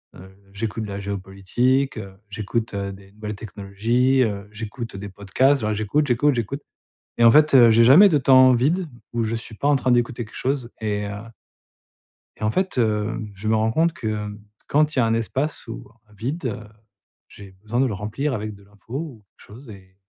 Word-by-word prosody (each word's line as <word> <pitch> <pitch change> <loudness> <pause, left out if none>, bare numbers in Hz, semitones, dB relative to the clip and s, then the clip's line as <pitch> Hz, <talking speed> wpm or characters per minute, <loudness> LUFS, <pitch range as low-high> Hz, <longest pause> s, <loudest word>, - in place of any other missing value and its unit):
heu 95 +1 -13 0.2
j'écoute 110 +1 -4
de - - -8
la 100 0 -5
géopolitique, 100 +7 -1
heu, 100 -3 -8
j'écoute, 110 +2 -3
heu, 100 0 -3
des 95 0 -15
nouvelles 105 0 -6
technologies, 110 +6 0
heu, 100 -3 -3
j'écoute, 115 +1 -7
heu, - - -5
des 100 +1 -7
podcasts. 105 +9 +1
Voilà 110 0 0
j'écoute, 110 +9 0
j'écoute, 140 +4 +3
j'écoute. 125 +4 -3 0.6
Et 120 - +3
en 115 - +8
fait, 155 +1 +5
heu, 120 -3 +8
j'ai 115 +1 +5
jamais 155 - +8
de 155 - +3
temps 130 -1 +6
vide 165 +9 +1 0.3
où 120 -1 0
je 115 +1 -2
suis 115 0 -8
pas 140 - -2
en 145 - +4
train 130 -1 +1
d'écouter 120 0 +1
quelque 110 - -16
chose 130 -2 -2
et 105 -1 -2
heu - - -5 1.3
et - - -8
en 105 - +2
fait, 185 +2 -1
hem, 110 -1 -1
je 105 +3 -6
me 110 - +3
rends 110 +1 +1
compte 165 +6 +2
que 105 -1 -3 0.4
quand 150 +1 +2
il 130 - +2
y - - +5
a - - +3
un 115 - +1
espace 130 +6 -2
ou 115 - -8 0.2
un - - -21
vide, 130 - -4
heu, 110 -4 -2 0.7
j'ai 100 -2 -13
besoin 115 +3 -2
de - - +3
le 115 - -3
remplir 110 +9 -3
avec 105 -2 -4
de 100 - -18
l'info, 100 +3 -16
ou 135 -9 -6
quelque - - -18
chose 120 +5 -13
et 95 -2 -14
115 Hz, 210 wpm, -22 LUFS, 105-130 Hz, 1.3 s, en